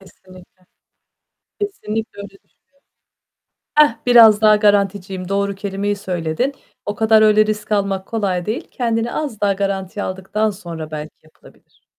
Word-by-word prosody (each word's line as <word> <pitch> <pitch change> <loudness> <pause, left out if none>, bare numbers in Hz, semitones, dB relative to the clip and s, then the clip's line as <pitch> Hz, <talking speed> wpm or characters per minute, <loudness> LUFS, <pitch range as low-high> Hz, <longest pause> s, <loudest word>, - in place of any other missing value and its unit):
Kesinlikle. 185 -1 -18 1.0
Kesinlikle 225 - -4
öyle 200 -1 -7
düşünüyorum. 195 0 -25 1.2
Hah, 300 -6 +5
biraz 225 -4 +7
daha 215 -1 +6
garanticiyim. 200 -3 0
Doğru 200 0 -1
kelimeyi 200 +1 -3
söyledin. 180 - -2 0.3
O 205 - -3
kadar 220 0 +4
öyle 215 0 +5
risk 215 0 -4
almak 195 -2 0
kolay 195 -6 -2
değil. 215 +3 -4
Kendini 230 -1 -1
az 285 -9 -4
daha 200 -1 +2
garantiye 195 0 -3
aldıktan 190 +3 -2
sonra 170 -6 -8
belki 155 0 -6
yapılabilir. 155 - -23
200 Hz, 130 wpm, -19 LUFS, 190-215 Hz, 1.2 s, biraz